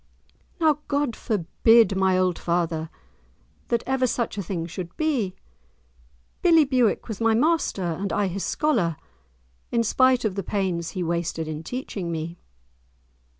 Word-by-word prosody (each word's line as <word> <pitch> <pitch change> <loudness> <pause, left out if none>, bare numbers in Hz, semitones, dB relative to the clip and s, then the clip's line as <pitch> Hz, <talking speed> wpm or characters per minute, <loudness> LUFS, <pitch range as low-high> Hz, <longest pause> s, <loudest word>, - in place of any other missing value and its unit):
"Now 310 -3 +3
God 285 -5 0
forbid, 220 +2 +3
my 190 -1 +3
old 185 -2 +1
father, 170 -2 -1 0.8
that 235 -1 0
ever 265 -1 +1
such 235 -3 -2
a 205 - -2
thing 170 -3 -3
should 175 0 -7
be! 255 -12 0 1.1
Billie 330 -3 +6
Bewick 255 -5 +1
was 220 -1 -6
my 225 -1 +3
master, 305 - +1
and 175 +3 -2
I 205 - +1
his 190 +1 -3
scholar, 230 - +1 0.8
in 235 -1 +2
spite 255 +2 +3
of 210 - 0
the 195 - -2
pains 185 -3 -2
he 180 - 0
wasted 170 -1 -2
in 155 0 -4
teaching 195 -3 -5
me." 165 +1 -5
200 Hz, 145 wpm, -24 LUFS, 170-250 Hz, 1.1 s, Billie